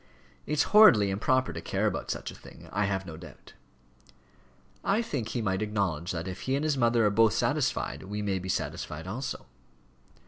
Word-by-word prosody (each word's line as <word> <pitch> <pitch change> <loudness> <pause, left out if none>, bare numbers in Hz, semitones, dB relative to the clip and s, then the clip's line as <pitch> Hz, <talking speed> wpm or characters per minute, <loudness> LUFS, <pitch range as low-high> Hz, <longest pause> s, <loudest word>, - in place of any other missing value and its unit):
It's 150 0 +2
horridly 115 - +7
improper 130 +6 +1
to - - -6
care - - -1
about - - -2
such - - -4
a - - -12
thing, 85 - -14
I 100 +3 0
have 95 -1 -2
no 80 -3 -8
doubt." 80 -5 -13 1.3
"I 215 +4 +2
think 125 - -4
we 120 - -1
might 95 -1 0
acknowledge 95 -6 -1
that 85 +1 -4
if 95 0 -6
he 135 - +2
and 140 - -1
his 155 -2 +1
mother 120 -3 +3
are 105 - +3
both 110 0 +4
satisfied, - - 0
we 105 +2 -5
may 95 -2 -1
be 95 +1 -7
satisfied 80 -3 -3
also." 120 +8 -5
105 Hz, 185 wpm, -28 LUFS, 95-120 Hz, 1.3 s, horridly